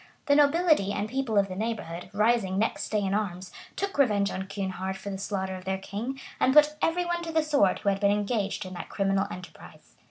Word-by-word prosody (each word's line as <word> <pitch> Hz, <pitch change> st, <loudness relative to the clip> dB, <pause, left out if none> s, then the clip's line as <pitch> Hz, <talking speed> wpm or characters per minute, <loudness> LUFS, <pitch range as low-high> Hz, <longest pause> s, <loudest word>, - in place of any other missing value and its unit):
The 285 Hz, -, +4 dB
nobility 295 Hz, -, +4 dB
and 205 Hz, +1 st, -2 dB
people 250 Hz, -2 st, -1 dB
of 200 Hz, -1 st, +4 dB
the 185 Hz, -, -6 dB
neighborhood, 210 Hz, -5 st, -4 dB
rising 210 Hz, -2 st, +2 dB
next 220 Hz, +3 st, -1 dB
day 210 Hz, -1 st, +1 dB
in 195 Hz, -1 st, -1 dB
arms, 185 Hz, -3 st, -2 dB, 0.2 s
took 395 Hz, -6 st, -3 dB
revenge 205 Hz, -7 st, +3 dB
on 190 Hz, +1 st, -4 dB
Kynehard 190 Hz, -1 st, -3 dB
for 200 Hz, -, -6 dB
the 195 Hz, -, -5 dB
slaughter 190 Hz, -1 st, -3 dB
of 185 Hz, -, -9 dB
their 190 Hz, 0 st, -1 dB
king, 215 Hz, +8 st, -5 dB, 0.2 s
and 260 Hz, -, +3 dB
put 300 Hz, 0 st, +6 dB
every 350 Hz, +2 st, +1 dB
one 345 Hz, 0 st, -1 dB
to 335 Hz, -1 st, -5 dB
the 320 Hz, -1 st, +2 dB
sword 285 Hz, -12 st, +3 dB
who 205 Hz, -, 0 dB
had 195 Hz, 0 st, 0 dB
been 200 Hz, -1 st, +3 dB
engaged 205 Hz, -1 st, -1 dB
in 185 Hz, -, -7 dB
that 175 Hz, -, -7 dB
criminal 195 Hz, 0 st, +1 dB
enterprise. 180 Hz, -3 st, -12 dB
205 Hz, 220 wpm, -27 LUFS, 195-265 Hz, 0.2 s, put